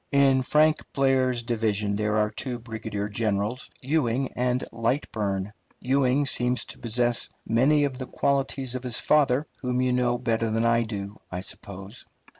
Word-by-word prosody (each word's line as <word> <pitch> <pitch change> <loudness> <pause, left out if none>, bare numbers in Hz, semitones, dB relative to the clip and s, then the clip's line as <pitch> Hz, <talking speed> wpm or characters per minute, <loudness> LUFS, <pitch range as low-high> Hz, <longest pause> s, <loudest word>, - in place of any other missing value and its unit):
In 135 -2 +4
Frank 155 +4 +4 0.2
Blair's 130 -3 +2
division 110 -3 0
there 105 +1 0
are 105 0 +2
two 125 +3 -4
brigadier 110 -3 -5
generals, 105 +2 -2
Ewing 135 -2 0
and 125 +1 0
Lightburne. 105 -5 -1 0.3
Ewing 135 +1 +2
seems 125 -2 0
to - - -9
possess 120 +1 0 0.2
many 135 +6 +3
of 135 -2 -1
the 130 - -5
qualities 135 -2 0
of 130 - -3
his 125 -2 0
father, 145 -2 +3
whom 125 -1 -1
you 130 0 +2
know 125 -1 +2
better 115 -1 0
than 115 +1 +1
I 115 0 +4
do, 105 -2 -5
I 90 0 -3
suppose. 100 +3 -9
120 Hz, 155 wpm, -26 LUFS, 110-130 Hz, 0.3 s, In